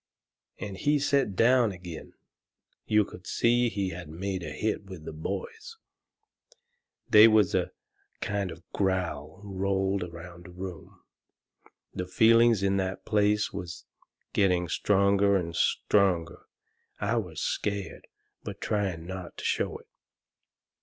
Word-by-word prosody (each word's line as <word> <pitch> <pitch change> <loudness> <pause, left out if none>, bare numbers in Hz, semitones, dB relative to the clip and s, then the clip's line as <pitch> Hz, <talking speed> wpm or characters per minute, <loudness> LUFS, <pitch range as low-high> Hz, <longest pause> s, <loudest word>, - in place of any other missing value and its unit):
And 100 -2 -6
he 145 +6 +2
set 140 -7 +1
down 120 +1 +4
agin. 90 -3 -9 0.7
You 105 -1 +4
could 90 - -12
see 120 +1 +2
he 100 -4 -2
had 85 -2 -8
made 95 +3 -4
a 80 - -5
hit 105 +7 -2
with 95 -5 -10
the - - -6
boys. 455 - -6 1.3
They 105 +1 +9
was 110 -4 +4
a - - +1 0.5
kind 100 -1 -2
of 80 - -8
a 85 - -22
growl 90 -5 -1
rolled 95 0 -1
around 85 0 -9
the - - -11
room. 90 0 -9 0.9
The 90 - -4
feelings 115 +1 +5
in 100 0 +2
that 95 0 -3
place 105 0 +2
was 90 0 -7 0.5
getting 90 -3 +2
stronger 100 +1 +3
and 85 -3 -1
stronger. 90 -3 +1 0.5
I 110 +3 0
was 90 -8 -4
scared, 100 -2 -3 0.3
but - - -7
trying 95 -6 -2
not 95 0 -7
to - - -7
show - - 0
it. - - -20
95 Hz, 135 wpm, -28 LUFS, 90-105 Hz, 1.3 s, They